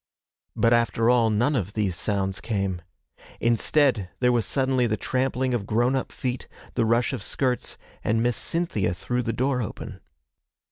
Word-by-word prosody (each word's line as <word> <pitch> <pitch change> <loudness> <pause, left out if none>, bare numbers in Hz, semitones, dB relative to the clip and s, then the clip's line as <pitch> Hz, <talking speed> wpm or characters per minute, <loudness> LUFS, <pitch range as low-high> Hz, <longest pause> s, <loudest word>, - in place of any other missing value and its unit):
But 115 +1 +3
after 115 0 +3
all, 120 -2 +4
none 120 +7 +2
of 100 -5 -2
these 100 -5 0
sounds 95 0 -1
came. 100 -5 -2 0.6
Instead, 120 -2 +2
there 125 - +4
was 120 -2 +1
suddenly 130 -2 +1
the 110 -1 0
trampling 130 +3 0
of 105 -5 -2
grown 120 +4 +2
up 130 - -2
feet, 125 -1 -4 0.3
the 115 - +1
rush 115 +4 +2
of 125 - -3
skirts, 125 +2 -1 0.3
and 115 +1 +1
Miss 120 0 +1
Cynthia 165 - -1
threw 125 +7 -2
the 115 - -1
door 125 +2 0
open. 105 - -6
120 Hz, 160 wpm, -25 LUFS, 110-125 Hz, 0.6 s, all